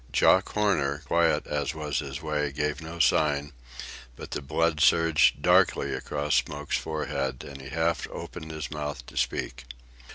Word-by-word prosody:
Jock 95 - +4
Horner, 85 -9 +1
quiet 85 -1 +2
as 75 +2 -2
was 75 -2 -2
his 70 +1 -6
way, 75 -2 -1
gave 75 0 -2
no 80 +2 -8
sign; 75 -3 +2 0.6
but - - -10
the - - -3
blood 80 +3 0
surged 80 -1 +4
darkly - - +3
across 75 +1 -2
Smoke's 75 0 -2
forehead, 70 -5 -3
and 70 -1 -9
he 65 - -9
half 80 +3 0
opened 80 - -8
his 80 -1 -5
mouth 75 -4 -5
to - - -14
speak. 60 +1 -2
75 Hz, 155 wpm, -27 LUFS, 70-80 Hz, 0.6 s, Jock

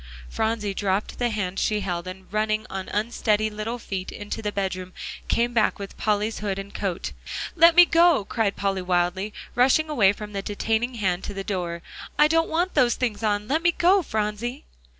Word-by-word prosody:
Phronsie 220 - -1
dropped 195 +1 -1
the 245 -1 +1
hand 195 -4 -2
she 210 -1 +1
held, 175 -2 -3
and 185 +1 -8
running 215 0 0
on 190 -1 -5
unsteady 215 0 0
little 215 +3 -4
feet 195 -5 -5
into 205 +2 -6
the 210 -1 -2
bedroom, 185 -2 -3 0.3
came 240 +1 +1
back 220 -2 +2
with 200 -2 -8
Polly's 210 +1 0
hood 200 -2 -2
and 195 0 -7
coat. 190 -4 -3 0.4
"Let 335 0 +7
me 355 0 +10
go," 335 - +4
cried 215 -2 0
Polly 195 -1 -1
wildly, 180 +3 0 0.2
rushing 270 +5 +3
away 210 -10 +5
from 210 0 -8
the 200 - -2
detaining 225 +4 -1
hand 190 -5 -1
to 205 - -6
the 195 - -4
door, 175 -4 -3 0.3
"I 300 - +6
don't 330 +1 +2
want 345 +3 0
those 250 -5 +3
things 230 -5 -2
on. 210 -1 0
Let 305 +5 +1
me 345 0 +3
go, 365 +3 +4
Phronsie!" 220 - -3
210 Hz, 190 wpm, -25 LUFS, 195-240 Hz, 0.4 s, me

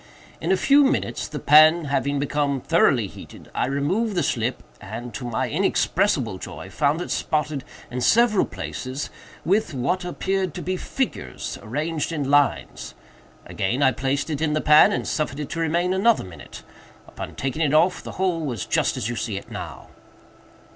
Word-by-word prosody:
In - - 0
a 190 - +4
few 285 +6 +5
minutes, 275 - 0
the - - -6
pan 155 +2 +6
having 140 0 0
become 140 0 0
thoroughly - - +3
heated, - - -12
I - - 0
removed 185 - 0
the 175 - +1
slip, 120 +1 -1 0.2
and, 110 +3 -7
to 100 - -6
my 115 - -1
inexpressible - - +1
joy, 80 +6 -8
found 150 - +1
it - - -5
spotted, 150 -3 -1 0.3
in 125 +1 -3
several 225 - +4
places, 130 +2 -5 0.3
with 185 -3 +1
what 155 +9 -1
appeared 190 0 -2
to - - -5
be 185 +1 -1
figures 180 - -4
arranged 150 +7 -2
in 145 -4 -2
lines. 145 -1 +1 0.5
Again 120 +9 -1
I 130 - +5
placed 135 +5 -2
it 150 0 -3
in 155 -2 +1
the 155 - +1
pan, 150 +6 +7
and - - -2
suffered 150 -2 -2
it 150 - -4
to 165 - -4
remain 170 +3 +1
another 215 +4 +3
minute. 90 -3 -11 0.4
Upon - - -8
taking 135 +4 -3
it 150 -2 +2
off, 180 +4 +3
the - - -8
whole 180 -3 0
was 120 -9 -3
just - - +1
as - - -2
you 120 - -3
see 110 -3 -3
it - - -9
now." - - -8
150 Hz, 175 wpm, -23 LUFS, 130-175 Hz, 0.5 s, pan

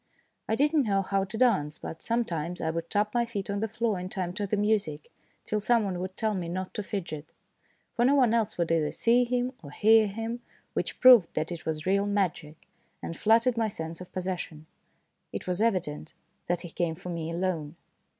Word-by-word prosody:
I 220 - +3
did 295 +5 +2
not 295 -5 +3
know 195 -2 +2
how 195 0 0
to 195 +3 -7
dance, 190 -12 +2
but 160 - -8
sometimes 180 -8 -1
I 160 - -1
would 165 +1 -4
tap 210 0 +1
my 240 -1 +3
feet 205 -4 -4
on 200 - -1
the 220 - 0
floor 225 -3 -1
in 180 +1 -5
time 180 -2 -3
to 205 +2 -2
the 210 - 0
music, 200 -8 0 0.3
till 210 - 0
some 230 +2 +3
one 190 -3 -2
would 185 +1 -5
tell 220 -1 +1
me 180 -4 -3
not 185 +2 -4
to - - -3
fidget. 170 -7 -5 0.6
For 240 - +1
no 270 +3 +5
one 250 -5 +4
else 220 -2 0
would 170 -1 0
either 160 -2 +2
see 240 +2 +3
him 245 +1 0
or 145 - -10
hear 215 +7 +5
him, 225 +4 -4 0.3
which - - -2
proved 245 -9 +7
that 155 +2 -1
it 170 -2 -6
was 155 -1 -2
real 200 +2 +2
magic, 175 -6 -2 0.4
and 165 - -4
flattered 230 +4 +3
my 225 -1 +2
sense 165 -4 -6
of 180 0 -10
pos 185 -1 -3
session. 170 -4 -4 0.7
It - - -5
was 180 +2 -1
evident 180 -9 -1 0.3
that 175 -1 0
he 175 - -8
came 165 -1 -1
for 180 +2 -8
me 165 -2 -3
alone. 170 -3 -2
195 Hz, 215 wpm, -28 LUFS, 170-225 Hz, 0.7 s, proved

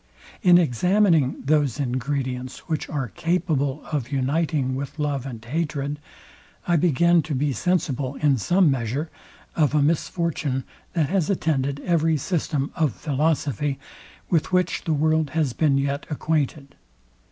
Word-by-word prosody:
In 180 -5 +7
examining 170 - +2
those 145 -2 +2
ingredients, 130 -1 -3
which 160 -3 -2
are 135 -5 -2
capable 155 -5 -1
of 140 -4 -2
uniting 140 0 0
with 135 +3 -5
love 145 -3 -2
and 115 -3 -8
hatred, 145 0 -2 0.7
I 175 - +3
begin 170 +1 +4
to 155 -2 -4
be 140 +1 0
sensible, 140 -6 -1
in 140 -4 +2
some 175 - +3
measure, 135 +5 -2 0.4
of 150 -3 +2
a 150 - +4
misfortune, 155 -3 -1 0.3
that 160 -5 +1
has 185 -4 +1
attended 140 -7 0
every 165 -2 +2
system 150 -3 -1
of 155 -7 +1
philosophy, 145 -1 -1 0.5
with 165 -1 +1
which 180 -1 +1
the 160 - +1
world 155 0 +2
has 145 -6 +1
been 145 -2 +2
yet 140 +1 -1
acquainted. 150 -2 -2
150 Hz, 135 wpm, -24 LUFS, 135-165 Hz, 0.7 s, In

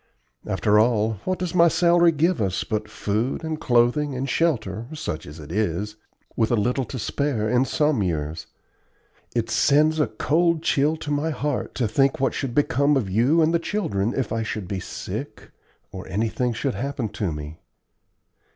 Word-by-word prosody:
After 105 +1 +2
all, 110 -2 +2
what 185 0 0
does 180 -2 -3
my 170 -1 +6
salary 170 0 +4
give 165 0 +1
us 95 -3 0
but 105 -1 -3
food 110 +9 -2
and 160 -1 -4
clothing 125 +4 +2
and 130 +2 -2
shelter, 115 - 0
such 85 - -5
as 75 +2 -10
it 75 0 -10
is, 105 +1 -1 0.4
with 110 - +1
a 120 - +3
little 125 +4 0
to 130 - -6
spare 125 -1 -1
in 125 +3 +2
some 150 -4 +1
years? 80 -3 -2 0.9
It 115 -1 -1
sends 155 +2 +3
a 150 - +3
cold 165 +8 +1
chill 150 +2 +2
to 150 -2 -5
my 145 +2 0
heart 145 -1 -3
to 120 - 0
think 135 +5 +2
what 135 - +1
should 130 -4 -3
become 145 0 +3
of 105 -8 -2
you 130 - +3
and 160 +2 +2
the 170 - +3
children 120 - -1
if 130 -6 -1
I 115 0 -1
should 110 -4 -4
be 95 -1 -3
sick - - -7 0.4
or - - -8
anything 115 +4 -1
should 130 +3 -2
happen 135 -2 -3
to 100 -3 -3
me. 75 +1 -7
125 Hz, 180 wpm, -24 LUFS, 105-150 Hz, 0.9 s, my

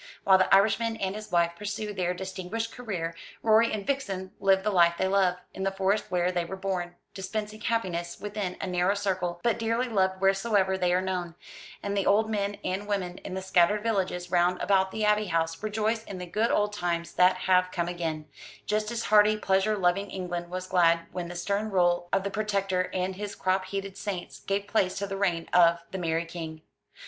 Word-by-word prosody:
While 190 -1 +6
the 185 - +2
Irishman 220 +3 +4
and 190 -2 -2
his 215 -2 -8
wife 170 -1 +3
pursue 210 +2 -4
their 180 -2 -1
distinguished 190 +4 -4
career, 185 -9 -4 0.3
Rorie 225 +1 +5
and 210 -2 -3
Vixen 195 -10 -2
live 190 -1 +3
the 210 - +1
life 170 -3 +4
they 190 - +1
love, 190 -2 +3 0.2
in 190 - -7
the 195 - +1
Forest 195 +2 0
where 180 0 +1
they 175 -1 0
were 170 +3 -6
born, 185 -2 -3 0.2
dispensing 210 +2 -5
happiness 180 -7 -2
within 205 -3 -4
a - - -3
narrow 180 +2 +1
circle, 185 -4 -2
but 235 -1 +1
dearly 230 +2 0
loved 190 -4 +1
wheresoever 195 0 +2
they 180 -1 +1
are 180 +1 +2
known; 180 -3 -3 0.5
and 200 0 -2
the 200 - 0
old 220 +2 +3
men 205 -1 -1
and 195 +3 -3
women 185 -3 -2
in 185 - -7
the 190 - -4
scattered 190 +3 +3
villages 190 -5 -1
round 180 0 +2
about 190 -1 +2
the 215 +2 -2
Abbey 210 0 +2
House 165 -1 -1
rejoice 215 +1 -1
in 195 - -7
the 180 - -5
good 215 +6 0
old 210 0 +1
times 170 -3 -2
that 180 +1 +5
have 185 -1 +3
come 170 -1 -1
again; 165 -3 -3 0.4
just 215 0 0
as 235 -1 -3
hearty 210 0 +5
pleasure 200 +1 +1
loving 195 +2 +1
England 175 -2 -4
was 185 +1 -4
glad 170 -2 +3
when 180 -1 -4
the 175 - -8
stern 200 +4 -1
rule 175 -2 +2
of 195 0 +1
the 200 - -3
Protector 195 -3 0
and 185 0 -2
his 205 0 -5
crop 185 0 0
headed 195 0 -5
saints 185 -9 -5
gave 195 +7 -2
place 200 -3 0
to 200 - -2
the 195 0 -5
reign 180 -4 0
of 170 -1 +6
the 190 - -4
Merry 165 -1 -1
King. 160 -2 -7
190 Hz, 205 wpm, -28 LUFS, 180-210 Hz, 0.5 s, While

